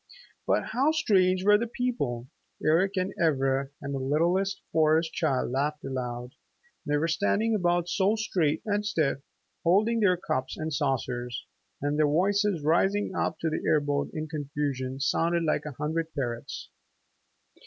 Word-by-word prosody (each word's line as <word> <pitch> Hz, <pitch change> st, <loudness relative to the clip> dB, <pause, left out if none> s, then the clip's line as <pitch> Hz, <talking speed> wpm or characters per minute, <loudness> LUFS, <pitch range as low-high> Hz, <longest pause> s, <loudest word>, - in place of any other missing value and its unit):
But -, -, +1 dB
how 260 Hz, +6 st, +2 dB
strange 185 Hz, -11 st, +2 dB
were 210 Hz, 0 st, +6 dB
the 235 Hz, -, -1 dB
people! 145 Hz, -, -2 dB, 0.4 s
Eric 180 Hz, +6 st, +3 dB
and 185 Hz, +1 st, -1 dB
Ivra 135 Hz, -3 st, +1 dB
and 140 Hz, 0 st, -4 dB
the 135 Hz, -, -2 dB
littlest 170 Hz, +8 st, +1 dB
Forest 160 Hz, +1 st, +3 dB
Child 135 Hz, -7 st, 0 dB
laughed 145 Hz, +3 st, -1 dB
aloud. 125 Hz, -2 st, -4 dB, 0.5 s
They 145 Hz, 0 st, +2 dB
were 160 Hz, +3 st, +1 dB
standing 205 Hz, +6 st, +1 dB
about 175 Hz, -3 st, +1 dB
so 190 Hz, +4 st, +2 dB
straight 170 Hz, -8 st, 0 dB
and 205 Hz, -1 st, 0 dB
stiff, 155 Hz, -10 st, 0 dB, 0.4 s
holding 210 Hz, +7 st, +3 dB
their 185 Hz, -4 st, +4 dB
cups 130 Hz, -6 st, -3 dB
and 155 Hz, 0 st, -3 dB
saucers, 125 Hz, -4 st, -2 dB, 0.4 s
and 145 Hz, +1 st, 0 dB
their 155 Hz, -, +4 dB
voices 195 Hz, +2 st, +1 dB
rising 190 Hz, +6 st, +2 dB
up 160 Hz, -, -1 dB
to 160 Hz, -, 0 dB
the -, -, -2 dB
air 155 Hz, -1 st, +3 dB
boat 145 Hz, -1 st, -1 dB
in 155 Hz, 0 st, -4 dB
confusion 140 Hz, -3 st, -3 dB
sounded 165 Hz, +4 st, +1 dB
like 155 Hz, -2 st, 0 dB
a 150 Hz, -, -6 dB
hundred 160 Hz, +2 st, -2 dB
parrots. 120 Hz, -4 st, -4 dB
160 Hz, 155 wpm, -28 LUFS, 140-190 Hz, 0.5 s, were